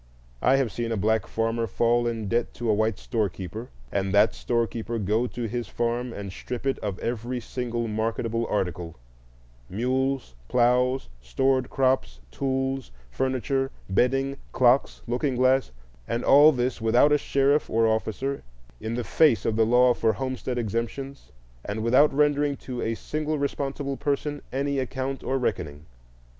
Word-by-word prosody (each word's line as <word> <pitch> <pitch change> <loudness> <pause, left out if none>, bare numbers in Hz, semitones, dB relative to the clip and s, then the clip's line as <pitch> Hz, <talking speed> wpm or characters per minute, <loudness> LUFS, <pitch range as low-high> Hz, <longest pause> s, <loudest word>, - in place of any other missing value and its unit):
I 130 +2 +4
have 135 -5 +1
seen 115 +4 -3
a 115 - 0
black 110 +3 +1
farmer 115 +1 -1
fall 120 +3 +2
in 115 -3 -3
debt 120 +3 -1
to 120 - -4
a - - +4
white 110 0 +1
storekeeper, 110 0 -3 0.2
and 95 -1 -1
that 105 +2 +5
storekeeper 115 -1 -2
go 110 +4 +1
to 120 0 -6
his 115 0 -3
farm 120 +3 -2
and 100 -3 -6
strip 125 +6 -6
it 135 - 0
of 100 -3 -3
every 120 +2 -3
single 120 -1 -3
marketable 115 +1 -1
article,—mules, 85 - -4
ploughs, 125 +2 +2
stored 130 - +1
crops, 130 - +1
tools, 135 -1 -2 0.2
furniture, 130 - 0 0.2
bedding, 135 +6 +1 0.2
clocks, 125 +1 +3
looking 125 +3 -1
glass,—and 115 - -1
all 145 +3 +7
this 125 -3 -1
without 120 +6 +4
a 150 - +4
sheriff 140 +2 +2
or 115 +1 +2
officer, 110 +5 -1 0.4
in 110 +1 -4
the 120 - -2
face 150 -1 +3
of 110 - +1
the 110 0 +3
law 125 +1 +5
for 115 -2 +1
homestead 130 +2 -3
exemptions, 120 - -4 0.3
and 105 +2 -4
without 130 +6 +5
rendering 145 0 +2
to 125 -2 -6
a 115 0 -1
single 155 +5 -3
responsible 140 -1 -2
person 145 0 -2
any 140 +1 -1
account 130 +1 -3
or 135 - 0
reckoning. 75 - -3
120 Hz, 150 wpm, -26 LUFS, 110-135 Hz, 0.4 s, all